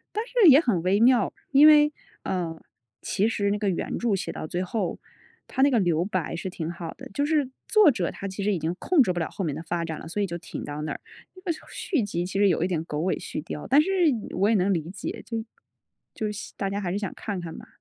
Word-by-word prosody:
但 435 Hz, -, 0 dB
是 480 Hz, -7 st, +5 dB
也 275 Hz, +2 st, +8 dB
很 215 Hz, -, 0 dB
微 190 Hz, +4 st, +2 dB
妙。 245 Hz, +1 st, +4 dB, 0.2 s
因 285 Hz, +2 st, +8 dB
为 300 Hz, -1 st, +7 dB, 0.3 s
呃， 170 Hz, -3 st, -3 dB, 0.4 s
其 200 Hz, -, 0 dB
实 205 Hz, -3 st, 0 dB
那 205 Hz, -, 0 dB
个 205 Hz, -1 st, 0 dB
原 180 Hz, -, -2 dB
著 235 Hz, -3 st, +1 dB
写 190 Hz, -, -2 dB
到 -, -, -5 dB
最 175 Hz, +3 st, -2 dB
后， 185 Hz, 0 st, -2 dB, 0.5 s
它 265 Hz, -, -1 dB
那 280 Hz, -, +6 dB
个 245 Hz, -, +3 dB
留 170 Hz, -3 st, +2 dB
白 185 Hz, -4 st, -2 dB
是 190 Hz, -, -4 dB
挺 165 Hz, -2 st, -4 dB
好 170 Hz, -1 st, -6 dB
的。 -, -, -11 dB
就 285 Hz, -, +1 dB
是 295 Hz, -4 st, +1 dB, 0.2 s
作 425 Hz, -7 st, +6 dB
者 185 Hz, -9 st, -1 dB
她 200 Hz, -, -6 dB
其 195 Hz, +1 st, -5 dB
实 210 Hz, 0 st, +2 dB
已 -, -, -1 dB
经 160 Hz, +2 st, -2 dB
控 345 Hz, -6 st, +4 dB
制 185 Hz, -, +1 dB
不 175 Hz, -, -3 dB
了 165 Hz, -, -1 dB
后 195 Hz, -, -4 dB
面 150 Hz, -4 st, -1 dB
的 160 Hz, -, -6 dB
发 170 Hz, 0 st, -2 dB
展 160 Hz, -2 st, -4 dB
了， -, -, -10 dB
所 205 Hz, +5 st, -2 dB
以 -, -, +1 dB
就 170 Hz, -2 st, -5 dB
停 -, -, -7 dB
到 145 Hz, +1 st, -5 dB
那 150 Hz, -1 st, -3 dB
儿。 -, -, -7 dB, 0.3 s
那 370 Hz, -, -15 dB
个 360 Hz, -3 st, 0 dB, 0.2 s
续 320 Hz, -, -1 dB
集 175 Hz, -4 st, -2 dB
其 195 Hz, +1 st, -3 dB
实 200 Hz, 0 st, +5 dB
有 165 Hz, -3 st, +1 dB
一 180 Hz, -, +2 dB
点 165 Hz, -3 st, -1 dB
狗 150 Hz, -2 st, -4 dB
尾 185 Hz, +3 st, 0 dB
续 -, -, -5 dB
貂。 150 Hz, -2 st, -6 dB
但 280 Hz, +3 st, +6 dB
是 315 Hz, -, -4 dB, 0.5 s
我 195 Hz, +3 st, +3 dB
也 225 Hz, -, +4 dB
能 195 Hz, -1 st, +2 dB
理 165 Hz, -2 st, -2 dB
解， 190 Hz, -, -6 dB
就 225 Hz, -1 st, -3 dB, 0.7 s
就 215 Hz, -1 st, -2 dB
希 210 Hz, -, -7 dB
大 195 Hz, -1 st, -2 dB
家 200 Hz, +1 st, -2 dB
还 180 Hz, -3 st, -2 dB
是 200 Hz, -, -1 dB
想 200 Hz, -4 st, -4 dB
看 200 Hz, -4 st, -4 dB
看 165 Hz, -2 st, -7 dB
嘛。 -, -, -10 dB
195 Hz, 285 characters per minute, -26 LUFS, 170-235 Hz, 0.7 s, 也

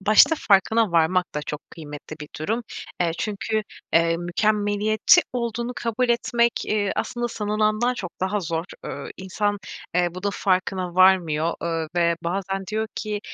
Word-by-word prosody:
başta 215 Hz, +10 st, +6 dB
farkına 205 Hz, 0 st, +3 dB
varmak 170 Hz, +2 st, +2 dB
da 150 Hz, -, -1 dB
çok 150 Hz, -1 st, -5 dB
kıymetli 150 Hz, -1 st, -9 dB
bir 150 Hz, -, -7 dB
durum. 220 Hz, +10 st, -1 dB, 0.4 s
Eee, 170 Hz, -2 st, +2 dB
çünkü, 215 Hz, +1 st, -1 dB, 0.3 s
eee, 165 Hz, 0 st, +4 dB
mükemmeliyetçi 210 Hz, -, +3 dB
olduğunu 235 Hz, 0 st, -2 dB
kabul 235 Hz, +2 st, 0 dB
etmek, 235 Hz, 0 st, +2 dB
eee, 205 Hz, -2 st, 0 dB
aslında, 240 Hz, 0 st, -2 dB
sanılandan 215 Hz, +2 st, 0 dB
çok 185 Hz, -8 st, -5 dB
daha 195 Hz, +2 st, 0 dB
zor. 165 Hz, -1 st, -2 dB, 0.2 s
Iıı, 140 Hz, -, -6 dB
insan, 205 Hz, +2 st, -1 dB, 0.4 s
eee, 175 Hz, 0 st, +3 dB
bunun 190 Hz, +3 st, -2 dB
farkına 185 Hz, -2 st, 0 dB
varmıyor, 170 Hz, -4 st, +4 dB
ııı, 165 Hz, -2 st, -2 dB
ve 170 Hz, -1 st, +3 dB
bazen 195 Hz, +2 st, -2 dB
diyor 220 Hz, +3 st, -1 dB
ki: 210 Hz, -1 st, -3 dB
195 Hz, 145 wpm, -24 LUFS, 170-215 Hz, 0.4 s, başta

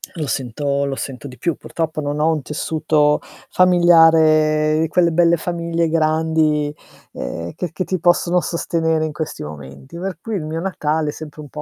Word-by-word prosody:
lo 155 Hz, -, -3 dB
sento 140 Hz, +2 st, -1 dB
lo 140 Hz, -1 st, -2 dB
sento 135 Hz, -1 st, -6 dB
di 125 Hz, -2 st, -11 dB
più. 170 Hz, -3 st, -1 dB
Purtroppo 160 Hz, -2 st, -4 dB
non 145 Hz, +1 st, -3 dB
ho 160 Hz, +2 st, +3 dB
un 155 Hz, -, -2 dB
tessuto 150 Hz, +1 st, +1 dB, 0.3 s
familiare 160 Hz, -3 st, +4 dB
quelle 170 Hz, +1 st, +3 dB
belle 170 Hz, +1 st, +3 dB
famiglie 170 Hz, 0 st, -1 dB
grandi, 155 Hz, -2 st, +1 dB, 0.4 s
ehm, 85 Hz, +7 st, -5 dB
che 180 Hz, -, -4 dB
che 165 Hz, +3 st, -3 dB
ti 185 Hz, 0 st, -2 dB
possono 175 Hz, +1 st, +2 dB
sostenere 160 Hz, -2 st, -1 dB
in 155 Hz, -, -3 dB
questi 155 Hz, -, -5 dB
momenti. 70 Hz, -, -10 dB
Per 185 Hz, -1 st, -4 dB
cui 225 Hz, +1 st, -4 dB
il 160 Hz, -6 st, -3 dB
mio 160 Hz, +1 st, -4 dB
Natale, 155 Hz, -4 st, -1 dB
è -, -, -1 dB
sempre 155 Hz, -1 st, -9 dB
un 145 Hz, -, -11 dB
po' 150 Hz, -, -7 dB
155 Hz, 175 wpm, -19 LUFS, 150-170 Hz, 0.4 s, familiare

